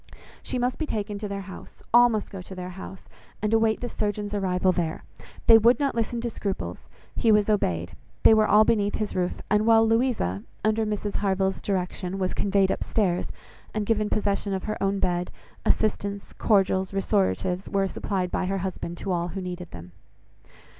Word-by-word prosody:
She - - -4
must 250 +1 -1
be 315 - -2
taken 205 -3 -3
to 210 - -4
their 200 0 -4
house; 190 -1 -11
all 240 0 +8
must 215 -3 -2
go 195 -2 -7
to 190 +1 -10
their 180 0 -6
house; 190 +1 -9 0.3
and 210 +1 -1
await 225 -1 +2
the 245 - -2
surgeon's 205 -2 -3
arrival 185 -2 +1
there. 170 -3 -2 0.4
They 225 -1 +8
would 235 +3 +4
not 280 -1 +1
listen 230 +1 -1
to 240 - -2
scruples: 200 -3 -4 0.3
he 230 - +3
was 210 0 +4
obeyed; 90 - -1 0.3
they - - +8
were 215 -1 +4
all 215 +1 +6
beneath 205 -3 +1
his 215 -1 -3
roof; 180 -1 -1
and 210 +1 +3
while 225 0 +6
Louisa, 225 - +1 0.2
under 220 0 +2
Mrs 210 -1 -2
Harville's 190 -1 0
direction, 185 -1 -2
was 185 -1 -1
conveyed 195 -1 +2
up - - -2
stairs, 185 -5 0 0.5
and 215 -1 -1
given 215 -1 +1
possession 200 -1 0
of 190 - -4
her 215 - -4
own 195 0 +1
bed, 180 -2 0 0.4
assistance, 200 -2 0
cordials, 190 -3 +2
restoratives 190 -2 0
were 195 -1 +1
supplied 185 -2 -2
by 185 - -1
her 195 +1 -1
husband 175 -2 -4
to 195 - -4
all 175 -1 0
who 190 +2 -5
needed 180 -1 -6
them. 85 +1 -10
200 Hz, 190 wpm, -26 LUFS, 185-215 Hz, 0.5 s, all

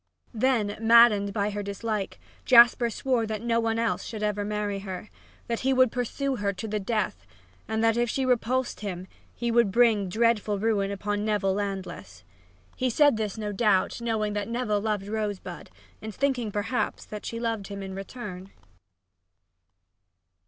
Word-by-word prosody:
Then, 220 -4 +1
maddened 225 -3 +6
by 205 0 -1
her 205 0 -3
dislike, 200 0 -4 0.2
Jasper 240 -1 +6
swore 235 0 0
that 215 0 -4
no 230 -1 +1
one 225 0 0
else 230 -1 0
should 215 -2 -6
ever 210 -1 0
marry 205 -1 -2
her 195 +1 -7 0.3
that 230 -1 -2
he 265 +1 +1
would 255 -2 +4
pursue 260 +2 -2
her 205 -1 0
to 190 +4 -6
the 210 0 -2
death, 195 - -2 0.4
and 220 +1 -1
that 225 0 +3
if 240 0 +1
she 265 +4 -1
repulsed 255 +1 0
him 185 -3 -5 0.3
he 240 -1 -2
would 235 -3 +3
bring 220 -4 +3
dreadful 220 0 +1
ruin 200 -1 +1
upon 205 +1 -2
Neville 205 -3 +1
Landless. 190 - -5 0.5
He 255 - 0
said 290 +2 +4
this, 215 -2 -3
no 210 -1 -3
doubt, 205 0 +1
knowing 220 -3 -1
that 205 -1 -2
Neville 230 -4 0
loved 210 -2 -1
Rosebud, 210 -2 -4 0.3
and 215 -1 -7
thinking, 260 -5 0
perhaps, 210 +5 -2
that 210 -1 -8
she 230 - -5
loved 225 -4 -2
him 200 -1 -6
in 190 0 -6
return. 195 -2 -7
215 Hz, 165 wpm, -27 LUFS, 200-235 Hz, 0.5 s, maddened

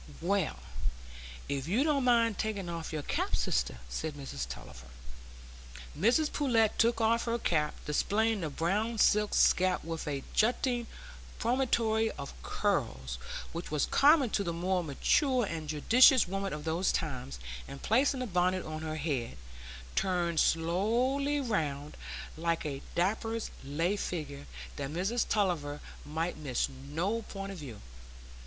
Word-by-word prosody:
"Well, 195 - 0 0.9
if 140 0 -2
you 220 +10 +2
don't 290 -4 +2
mind 230 -3 +3
taking 200 -5 -2
off 165 -1 -5
your 155 -2 -3
cap, - - -1
sister," 60 0 0
said 155 - -4
Mrs 100 - -5
Tulliver. 60 0 -9 1.1
Mrs 245 - +3
Pullet 230 -7 +3
took 230 0 +3
off 230 +1 +2
her 235 0 0
cap, 150 -9 0
displaying 210 +8 +1
the 160 - -2
brown 205 +10 0
silk 210 0 +3
scalp 185 0 +4
with 165 -1 -5
a 140 -2 -2
jutting 240 +1 +1 0.5
promontory 230 -3 +2
of 140 - -7
curls 65 -1 -1 0.3
which 170 +1 -5
was 150 -2 +1
common 285 -4 +5
to 200 - +1
the 170 - -2
more 180 +2 0
mature 245 - +2
and 160 -5 -5
judicious 235 - +6
women 195 +1 -2
of 150 0 -5
those 165 +4 +1
times, 130 - -3 0.3
and 140 - -9
placing 260 +4 +2
the - - -1
bonnet 185 -2 +1
on 155 0 -5
her 155 -1 -3
head, 140 - -2 0.6
turned 175 -4 +1
slowly 235 - +2
round, 150 - -2 0.4
like 165 0 -1
a 140 -2 -3
draper's 220 +5 0
lay 165 +8 0
figure, 145 -8 -4 0.3
that 140 -1 -3
Mrs 190 +10 0
Tulliver 165 -8 0 0.2
might 160 +4 -2
miss 135 -5 0
no 160 +12 -2
point 195 -2 -6
of 190 - -8
view. 125 -8 -8
180 Hz, 140 wpm, -31 LUFS, 150-225 Hz, 1.1 s, judicious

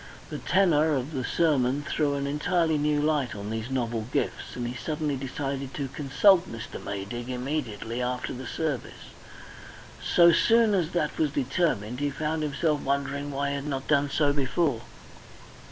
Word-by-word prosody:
The - - -4
tenor 160 -5 +3
of 135 +3 -2
the 130 -3 -2
sermon 140 -3 +1
threw 145 -1 +1
an 140 0 -2
entirely 160 +2 +1
new 150 0 +2
light 145 -6 +1
on 100 +1 -5
these 110 +2 -3
novel 115 -4 -2
gifts, - - -2
and 120 -1 -3
he 120 - -4
suddenly 150 +3 -2
decided 135 0 -4
to 140 -2 -3
consult 155 +7 +3
Mr. 115 -1 -7
Maydig 100 +5 -5
immediately 125 -3 -3
after 125 0 -2
the 130 0 -7
service. 150 -6 -4 0.9
So 170 -1 +6
soon 225 +4 +4
as 175 -5 +1
that 155 -4 -1
was 155 - +3
determined, 130 - 0
he 145 0 0
found 155 +2 -2
himself 150 0 0
wondering 140 +1 -1
why 140 0 -1
he 140 - -1
had 140 +1 -5
not 135 -2 -3
done 145 -1 +3
so 145 0 +2
before. 140 -2 0
140 Hz, 165 wpm, -27 LUFS, 125-155 Hz, 0.9 s, So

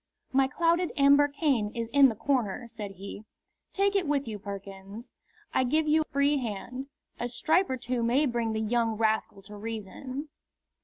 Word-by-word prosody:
"My 265 0 +4
clouded 335 +5 +1
amber 285 +1 +6
cane 280 -7 +1
is 230 -1 -2
in 280 -1 +7
the 225 - -4
corner," 240 -2 -1
said 210 -4 -7
he. 200 +2 -8 0.5
"Take 400 +1 +1
it 380 -5 +2
with 280 -3 0
you, 215 -2 -5
Perkins. 200 +2 -8 0.4
I - - +3
give 310 +5 +1
you 310 +1 +4
a - - -2
free 285 +1 +3
hand. 250 +2 -5 0.3
A 240 - -1
stripe 320 +9 +2
or 260 - -1
two 245 0 -2
may 245 +6 +3
bring 235 -4 -1
the 220 - -1
young 225 0 +1
rascal 220 -3 0
to 210 +1 -11
reason." 225 +7 -6
245 Hz, 175 wpm, -28 LUFS, 220-285 Hz, 0.5 s, in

